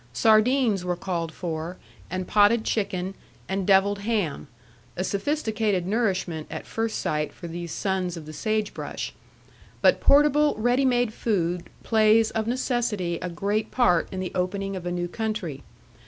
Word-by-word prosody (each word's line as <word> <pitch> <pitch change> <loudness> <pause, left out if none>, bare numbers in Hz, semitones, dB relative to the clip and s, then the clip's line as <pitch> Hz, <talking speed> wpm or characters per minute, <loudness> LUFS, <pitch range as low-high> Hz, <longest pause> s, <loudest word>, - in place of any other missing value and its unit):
Sardines 220 - +3
were 180 0 -1
called 175 -2 -3
for, 165 +1 -5 0.3
and 185 0 -3
potted 215 +2 +4
chicken, 190 -4 -1 0.3
and 190 -1 -2
devilled 200 +1 +4
ham: 200 -9 -1 0.5
a 185 - 0
sophisticated 210 - 0
nourishment, 190 -7 -1
at - - -6
first 225 0 -2
sight, 150 0 -1
for 170 - -9
these 170 0 -6
sons 185 -2 -1
of 160 - -8
the 155 - -9
sage 215 +4 -1
brush. - - -5 0.7
But - - +4
portable 295 +1 +5
ready 245 +4 +2
made 245 -3 +2
food 180 -7 -1 0.2
plays 220 0 +4
of 220 0 -2
necessity 230 -8 -1
a 180 - -3
great 205 +5 -1
part 180 -10 +3
in 190 - -4
the 185 -1 -3
opening 195 +2 -2
of 180 -1 -5
a - - -1
new 175 0 -2
country. 200 -8 -3
195 Hz, 155 wpm, -25 LUFS, 175-220 Hz, 0.7 s, portable